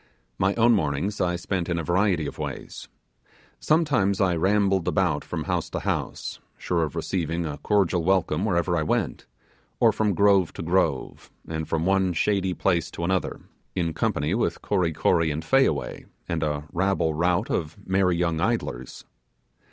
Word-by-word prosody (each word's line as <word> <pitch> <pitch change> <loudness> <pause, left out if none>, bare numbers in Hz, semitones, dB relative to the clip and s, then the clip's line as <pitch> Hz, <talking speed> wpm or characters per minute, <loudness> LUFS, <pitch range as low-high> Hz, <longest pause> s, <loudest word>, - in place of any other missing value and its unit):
My 95 +1 +2
own 115 +1 +4
mornings 90 +2 -1
I 90 -1 +1
spent 90 0 -3
in 85 - 0
a 85 - -2
variety 90 -1 +1
of 70 - -7
ways. - - -6 0.7
Sometimes 145 - +2
I 95 -3 +2
rambled 95 +1 +2
about - - +1
from - - -4
house - - -2
to - - -4
house, - - -3 0.2
sure 85 -2 -1
of 75 -3 -2
receiving 85 -2 -2
a 75 -2 -5
cordial 95 -5 +1
welcome 95 -2 +1
wherever 90 -4 +1
I 80 - +1
went; 75 - -1 0.5
or 115 - +5
from 105 -2 0
grove 100 -3 +4
to - - -6
grove, 85 -5 -1 0.2
and 80 -1 -4
from 80 0 0
one 95 -1 +2
shady 95 +1 0
place 85 -4 +1
to 85 - -5
another, 95 +2 -1 0.3
in 85 -3 -1
company 75 +1 0
with 115 - -1
Kory 90 -5 +1
Kory 80 +1 +2
and 80 +2 -3
Fayaway, 135 +7 +1 0.2
and 85 -2 -2
a 75 -2 -1
rabble 95 -3 +1
rout 85 +3 +1
of 80 -2 -2
merry 95 -2 +2
young 85 -2 0
idlers. 95 - -2
90 Hz, 165 wpm, -25 LUFS, 80-95 Hz, 0.7 s, or